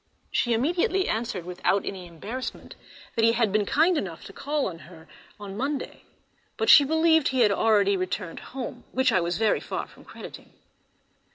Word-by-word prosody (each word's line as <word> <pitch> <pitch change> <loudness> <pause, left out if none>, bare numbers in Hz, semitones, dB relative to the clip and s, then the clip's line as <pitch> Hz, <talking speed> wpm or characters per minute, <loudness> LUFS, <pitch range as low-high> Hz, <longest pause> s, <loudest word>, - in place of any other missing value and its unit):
She 240 - +1
immediately 350 - +1
answered, 215 -6 -2
without 180 +2 0
any 185 -2 -6
embarrassment, 210 +10 -7 0.4
that 225 - +1
he 230 0 +5
had 230 -3 +1
been 210 0 +1
kind 330 +2 +3
enough 170 -4 -7
to 195 - -11
call 290 +4 -2
on 170 -3 -5
her 160 -3 -15 0.3
on 200 -1 -8
Monday; 275 +5 -4 0.5
but 445 - +4
she 290 - +9
believed 320 +1 +3
he 260 -1 +1
had 210 -3 +5
already 200 -1 +3
returned 185 -2 -4
home, 250 -1 -7
which 260 -1 +2
I 185 - +3
was 170 +1 -1
very 220 -1 +2
far - - -4
from - - -18
crediting. - - -11
225 Hz, 175 wpm, -26 LUFS, 195-275 Hz, 0.5 s, she